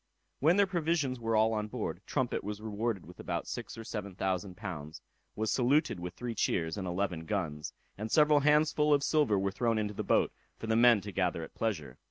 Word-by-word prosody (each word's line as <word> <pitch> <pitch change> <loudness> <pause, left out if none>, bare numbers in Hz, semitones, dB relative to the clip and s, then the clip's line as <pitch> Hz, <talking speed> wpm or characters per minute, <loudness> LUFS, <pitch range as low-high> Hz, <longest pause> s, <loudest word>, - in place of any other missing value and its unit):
When 165 +7 +4
their 200 - +6
provisions 165 -8 0
were 115 -1 0
all 110 +1 +4
on 105 -1 -1
board, - - -4
Trumpet - - -1
was 105 0 -4
rewarded 110 -1 -2
with 90 - -14
about - - -3
six - - -6
or 115 - -6
seven 105 -4 -5
thousand 95 0 -2
pounds, 80 -6 -6 0.4
was 110 0 -1
saluted 135 - +2
with 90 +1 -6
three 120 -1 -4
cheers, 80 -6 0
and 95 -3 -4
eleven 90 -2 -2
guns; 80 -7 -3 0.3
and 110 +1 -4
several 150 -1 +5
handsfull 150 0 +4
of 140 - 0
silver 145 -11 +3
were 95 0 0
thrown 115 +3 0
into 105 -1 -1
the - - -3
boat, - - +2 0.3
for - - -7
the 110 0 +1
men 120 -2 +6
to 100 +2 -7
gather 90 -3 0
at - - -10
pleasure. 80 - -3
110 Hz, 210 wpm, -31 LUFS, 95-125 Hz, 0.4 s, their